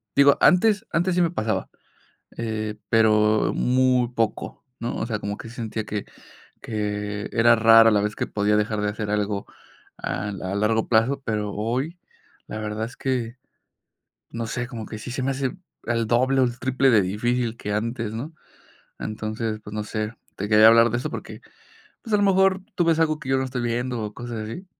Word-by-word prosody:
digo, 140 0 +6
antes 210 +4 +4
antes 175 +2 +1
sí 180 - +3
me 170 -1 +2
pasaba, 110 -8 -2 0.7
eh, 110 -2 -3
pero 110 -1 +3
muy 125 -1 +2
poco, 115 -3 -3 0.2
¿no? 120 +1 -3
O 110 - -2
sea, 110 -2 -2
como 100 0 -4
que - - -9
sentía 115 -2 -4
que 105 0 -4 0.6
que 105 -1 -3
era 115 0 +5
rara 115 0 +7
la 105 -1 +3
vez 105 +1 -2
que - - -2
podía 105 0 +1
dejar 105 0 0
de 105 - 0
hacer 105 0 -4
algo 105 -1 -1 0.5
a 100 +3 -3
a 95 -1 -4
largo 110 +2 +1
plazo, 125 +5 +2
pero 105 -3 -2
hoy 130 - -2 0.5
la - - -6
verdad 110 +1 -3
es 120 - -11
que, 125 -2 -2 0.9
no 115 -1 -4
sé, 120 +2 -3
como 115 -4 -7
que 110 - -7
sí 125 - -7
se 130 - -3
me 135 - +1
hace 135 +5 -3 0.3
el 115 -2 0
doble, 130 +4 +2
o, 130 - +5
el 120 0 -3
triple 130 +1 +2
de 110 -5 +5
difícil 115 +5 -1
que 105 -2 -4
antes, 115 0 -2
¿no? 135 +9 -6 0.7
Entonces, 110 0 -4
pues, 105 - -9
no 105 - -2
sé, 110 +1 -4 0.2
te 100 +1 -4
quería 110 0 +7
hablar 115 0 +6
de 120 - 0
eso - - -4
porque, - - -7 0.6
pues, 225 - -5
a - - +6
lo 205 - +2
mejor 190 -1 +3
tú 175 - +2
ves 165 -1 +3
algo 155 -1 +2
que 135 - -8
yo 135 - +3
no 130 - 0
estoy 125 -1 -4
viendo, 120 0 -2
o, 105 0 -5
cosas 120 -1 -6
así. 180 - -7
115 Hz, 195 wpm, -24 LUFS, 105-130 Hz, 0.9 s, rara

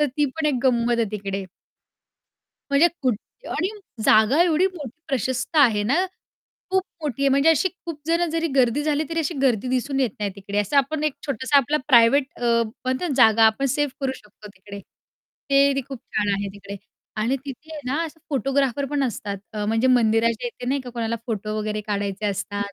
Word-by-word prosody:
तर 295 - +4
ती 295 - +3
पण 320 -1 0
एक 295 - +2
गंमत 240 -2 +2
आहे 220 -3 0
तिकडे. 195 -1 -4 1.3
म्हणजे 295 +5 +5
कुठे 255 - -3
आणि 360 - -1 0.4
जागा 220 +11 +5
एवढी 350 +1 +3
मोठी 315 -9 -6 0.2
प्रशस्त 260 +3 -2
आहे 230 -8 +5
ना, 275 - +2 0.7
खूप 380 0 +2 0.2
मोठी 275 -3 -3
आहे 275 - +4
म्हणजे 275 +4 +3
अशी 325 +4 +2 0.2
खूप 325 -3 -6
जणं 335 +1 +2
जरी 330 0 0
गर्दी 260 +1 +3
झाली, 300 0 0
तरी 330 - -3
अशी 320 +2 -2
गर्दी 250 -2 +2
दिसून 265 +2 -1
येत 250 -5 +1
नाही 205 -1 -1
तिकडे 200 +1 -4
असं 210 +8 0
आपण 290 +3 +1
एक 305 -3 0
छोटासा 280 0 +1
आपला 280 +2 +3
प्रायव्हेट 245 +2 +6
अ, - - -11 0.4
म्हणते 260 +7 -1
ना - - -1
जागा 225 -2 +6
आपण 220 +5 +1
सेव्ह 290 -3 0
करू 270 -1 0
शकतो 210 0 -16
तिकडे. 200 +1 -10 0.7
ते 275 0 +5
ती 275 - 0
खूप 270 -3 -6 0.2
छान 210 -1 +1
आहे 200 0 -3
तिकडे 200 0 -9 0.4
आणि 245 +5 +1
तिथे 300 +4 -9
आहे 300 - -6
ना, 290 +6 0
असं 320 0 -9
फोटोग्राफर 275 0 0
पण 290 -1 0
असतात 205 -4 -3 0.2
अ, 210 -1 -3
म्हणजे 225 +3 +1
मंदिराच्या 230 -1 +2
येथे 245 +1 -7
नाही 275 +1 0
का 250 - -9
कोणाला 230 -1 -2
फोटो 215 -2 -3
वगैरे 215 0 -2
काढायचे 205 0 -2
असतात 200 0 -3
255 Hz, 195 wpm, -23 LUFS, 215-290 Hz, 1.3 s, प्रायव्हेट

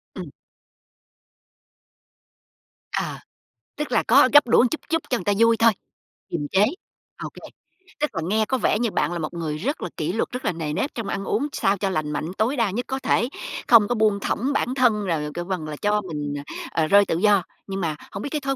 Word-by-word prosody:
Ừm. - - -6 2.6
Ờ. - - -2 0.6
Tức 300 -3 -4
là 235 - +3
có 260 +3 +5
gắp 290 -1 +7
đũa 240 +1 +5
chút 315 - -3
chút 325 -1 +1
cho 250 - +2
người 180 - -8
ta 205 - +2
vui 230 0 +5
thôi, 230 0 +5 0.6
kiềm 150 -4 -2
chế. 195 +2 +5 0.6
Ô - - -4
kê, - - -13 0.6
tức 300 - +1
là 165 - -1
nghe 215 +2 +2
có 260 - 0
vẻ 215 -3 +1
như 235 -2 0
bạn - - 0
là 175 - -3
một 155 +1 -4
người 160 -3 -3
rất 270 - -3
là - - -3
kỷ - - -2
luật, - - -1
rất 250 +1 -5
là - - +2
nề 160 -3 -4
nếp 230 - -2
trong 230 -4 -4
ăn 195 - -3
uống 245 +8 0
sao 195 +1 +1
cho 195 +1 -1
lành 155 -5 -2
mạnh 155 +3 -3
tối 240 +6 +1
đa 230 -5 +1
nhất 240 +6 -3
có 265 0 -2
thể, 240 -1 +1 0.4
không 225 -4 +7
có 245 - 0
buông 215 -2 +2
thõng 255 +7 -1
bản 260 -2 0
thân, 225 -6 +2
rồi 150 -4 -1
kêu 175 - -4
bằng 180 -4 -3
là 155 - -5
cho 210 0 +2
mình, 150 -6 -4
ờ, 140 - -6 0.4
ờ, 155 - +1
rơi 200 +2 +6
tự 165 - -1
do. 200 -1 +4 0.2
Nhưng 195 -1 -4
mà 160 -3 -1 0.2
hổng 195 - -6
biết - - -4
cái 300 - -2
thói 275 0 -1
210 Hz, 230 wpm, -23 LUFS, 175-245 Hz, 2.6 s, gắp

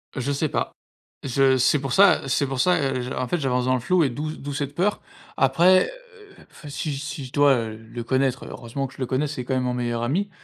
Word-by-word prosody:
Je 135 +2 -2
sais 145 +1 0
pas, - - -2 0.5
je 135 0 +3
c'est 130 +4 +3
pour 135 -2 -3
ça 200 -7 +5
c'est 135 +1 +1
pour 135 -1 -4
ça, 180 +7 +4
heu, 135 -2 -1
je 125 +1 -5
en 125 - -2
fait 175 - 0
j'avance 125 -3 0
dans 130 0 +2
le - - -1
flou 175 +7 +2
et 140 - +2
d'où 150 +5 -4
d'où 145 +1 -6
cette 140 -1 -3
peur. 195 +6 0 0.4
Après, 170 +8 +5 0.5
heu, - - -17
enfin 150 - -13
si 145 0 -3
si 145 -1 -6
je 125 - -11
dois, 145 0 +5
heu, 110 -2 -3
le 115 +2 -8
connaître 130 +1 0
heureusement 130 +3 -5
que 135 - -16
je - - -19
le 130 - -1
connais, 130 +4 0
c'est 140 -4 -5
quand 130 - -2
même 130 -1 +1
mon 125 -1 -1
meilleur 120 -1 -2
ami, 170 +13 -1
135 Hz, 255 wpm, -24 LUFS, 125-145 Hz, 0.5 s, ça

